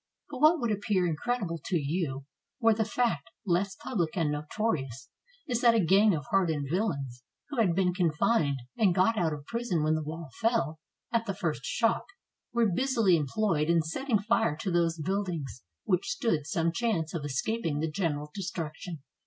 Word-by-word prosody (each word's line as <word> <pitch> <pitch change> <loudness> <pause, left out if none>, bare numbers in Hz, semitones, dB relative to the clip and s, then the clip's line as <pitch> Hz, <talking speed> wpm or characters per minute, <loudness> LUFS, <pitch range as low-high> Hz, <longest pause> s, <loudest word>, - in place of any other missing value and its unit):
But 260 - -6
what 310 +3 +6
would 235 -4 0
appear 205 -3 +1
incredible 175 +1 -1
to 180 - 0
you, 140 -3 -2 0.3
were 225 -2 +5
the 220 +1 +1
fact 210 - 0 0.2
less 190 +1 +1
public 180 -7 -2
and 160 -4 +1
notorious, 150 - -2 0.4
is 240 -3 0
that 235 -1 +6
a - - +4
gang 200 +2 +5
of 145 -3 -5
hard 195 -3 +3
ened 145 -3 -2
villains, 140 - -2 0.3
who 285 -4 -3
had 185 -7 +3
been 180 -1 +2
confined 160 -3 +2 0.2
and 195 -6 +3
got 195 +5 +3
out 170 -6 +1
of 145 -2 -6
prison 230 -8 -1
when 155 +1 +2
the 155 - 0
wall 155 -1 -6
fell, 160 - +1 0.3
at 230 0 0
the 195 - -2
first 160 -8 -2
shock, 230 -1 +1 0.5
were 235 -1 +2
busily 230 -3 +3
employed 160 +1 0
in 170 -1 +4
setting 230 - 0
fire 225 -5 +1
to 185 +3 -3
those 170 -1 +2
buildings 165 - -3 0.2
which 180 0 +1
stood 225 - 0
some 170 -2 +1
chance 175 -6 -1
of 165 -4 -3
escaping 145 - -1
the 160 - 0
general 150 -4 -2
destruction. 165 -4 -5
175 Hz, 180 wpm, -29 LUFS, 155-220 Hz, 0.5 s, what